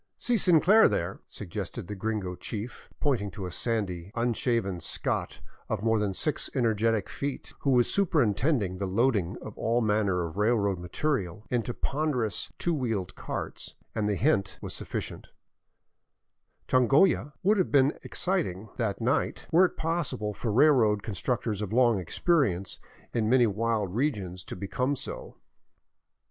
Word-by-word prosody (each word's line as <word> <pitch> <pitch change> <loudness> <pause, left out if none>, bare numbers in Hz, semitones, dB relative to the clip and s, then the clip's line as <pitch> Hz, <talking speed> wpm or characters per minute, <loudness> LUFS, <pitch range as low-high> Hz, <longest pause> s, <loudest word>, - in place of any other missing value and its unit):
" - - -56
See 245 - +3
Sinclair 190 +2 +6
there," 85 +3 -2
suggested 90 -3 -6
the 105 - -6
gringo 105 -2 -2
chief, 110 +5 -7
pointing 125 -8 +1
to 95 0 -7
a 90 - -5
sandy, 95 -4 -2
unshaven 115 -5 0
Scot - - -2 0.3
of 110 -2 -2
more 115 -1 +3
than 100 -2 -1
six 150 - 0
energetic 115 -4 +1
feet, 140 -1 -5
who 140 - -1
was 125 -2 +4
superintending 125 - +1
the 100 - -1
loading 105 -2 +1
of 110 - -8
all 115 +2 +2
manner 105 -5 +1
of 85 +3 -7
railroad 105 -3 +2
material 100 - -2
into 120 -1 0
ponderous 130 -9 -1
two 175 - 0
wheeled 115 - -2
carts; - - -5 0.2
and 105 -1 0
the 105 - +1
hint 100 -5 +1
was - - -6
sufficient - - -5 1.4
Changolla 140 +5 +3
would 205 +2 +4
have 185 - +1
been 140 0 +4
excited 110 - -2
that 110 -3 -1
night 130 +6 0
were 180 +3 +6
it - - -4
possible 145 -10 -2
for 110 +2 -3
railroad 115 -5 +4
constructors 110 0 -2
of 105 -2 -3
long 120 -3 +4
experience 100 - 0 0.3
in 110 -2 +1
many 125 0 +5
wild 110 -2 0
regions 100 -9 -2
to - - -6
be 100 +2 -5
come 125 +7 0
so. - - -7
115 Hz, 150 wpm, -28 LUFS, 100-135 Hz, 1.4 s, Sinclair